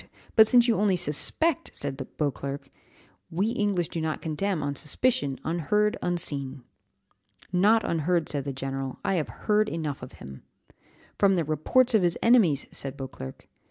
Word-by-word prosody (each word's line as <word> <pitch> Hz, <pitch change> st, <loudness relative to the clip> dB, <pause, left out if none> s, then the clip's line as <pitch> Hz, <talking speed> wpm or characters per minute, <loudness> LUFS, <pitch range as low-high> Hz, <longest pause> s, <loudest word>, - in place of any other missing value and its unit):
But 220 Hz, -1 st, +8 dB
since 240 Hz, +1 st, +5 dB
you 230 Hz, -, +3 dB
only 200 Hz, -2 st, +3 dB
suspect," 180 Hz, -, 0 dB
said 140 Hz, -1 st, -4 dB, 0.2 s
Beauclerc, 140 Hz, -1 st, -3 dB, 0.6 s
"we 195 Hz, +6 st, 0 dB
English 205 Hz, -7 st, 0 dB
do 165 Hz, -, -4 dB
not 160 Hz, -1 st, -2 dB
condemn 160 Hz, +1 st, -2 dB
on 145 Hz, 0 st, -1 dB
suspicion, 145 Hz, -, 0 dB
unheard, 190 Hz, +6 st, +1 dB
unseen." 140 Hz, -7 st, -2 dB, 0.9 s
"Not 210 Hz, +5 st, +4 dB
unheard," 170 Hz, 0 st, +1 dB
said 140 Hz, -2 st, -2 dB
the 140 Hz, -, -2 dB
general, 135 Hz, 0 st, -4 dB
"I -, -, +2 dB
have -, -, -7 dB, 0.2 s
heard 215 Hz, 0 st, +3 dB
enough 155 Hz, -4 st, -4 dB
of -, -, -9 dB
him." 70 Hz, 0 st, -11 dB, 0.8 s
"From 195 Hz, -1 st, +5 dB
the 170 Hz, -, +1 dB
reports 235 Hz, -, +2 dB
of 220 Hz, -, +5 dB
his 175 Hz, -1 st, +1 dB
enemies," 205 Hz, -, +4 dB
said 135 Hz, 0 st, -5 dB
Beauclerc. 130 Hz, -, -8 dB
165 Hz, 155 wpm, -27 LUFS, 140-210 Hz, 0.9 s, But